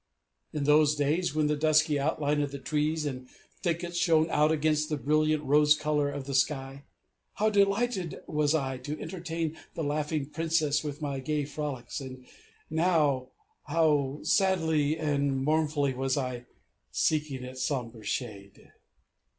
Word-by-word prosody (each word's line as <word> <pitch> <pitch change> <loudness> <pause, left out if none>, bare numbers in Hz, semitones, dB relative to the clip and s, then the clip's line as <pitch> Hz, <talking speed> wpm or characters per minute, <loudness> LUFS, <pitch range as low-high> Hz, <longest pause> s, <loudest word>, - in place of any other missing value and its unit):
In 150 - -2
those 150 +1 +4
days, 150 +3 0
when 155 -1 +2
the 150 0 +1
dusky 155 0 +3
outline 145 0 0
of 145 - -1
the 140 - -5
trees 150 +3 -1
and 130 -3 -5 0.3
thickets 175 0 -2
shone 160 -1 +3
out 150 +1 +3
against 155 0 +1
the 150 - -1
brilliant 155 +2 +1
rose 150 +2 +5
colour 150 -1 0
of 140 -1 -5
the 140 - -5
sky, 135 +1 -1 0.5
how 215 +1 +2
delighted 200 -2 +1
was 150 0 +1
I 135 -4 -2
to 145 +4 -5
entertain 165 -3 -4 0.2
the 165 - -2
laughing 150 0 -1
Princess 155 0 0
with 150 0 -5
my 140 -2 -2
gay 150 +2 -1
frolics! 140 -4 -5
And 130 -1 -9 0.4
now, 155 -5 +2 0.4
how 150 -4 +1
sadly 160 -6 +2
and 140 -3 0
mournfully 150 -2 +1
was 135 +2 -1
I 125 -3 -3 0.5
seeking 150 -4 0
its 130 0 -7
somber 120 -6 -3
shade! 100 -3 -5
150 Hz, 145 wpm, -29 LUFS, 140-155 Hz, 0.5 s, rose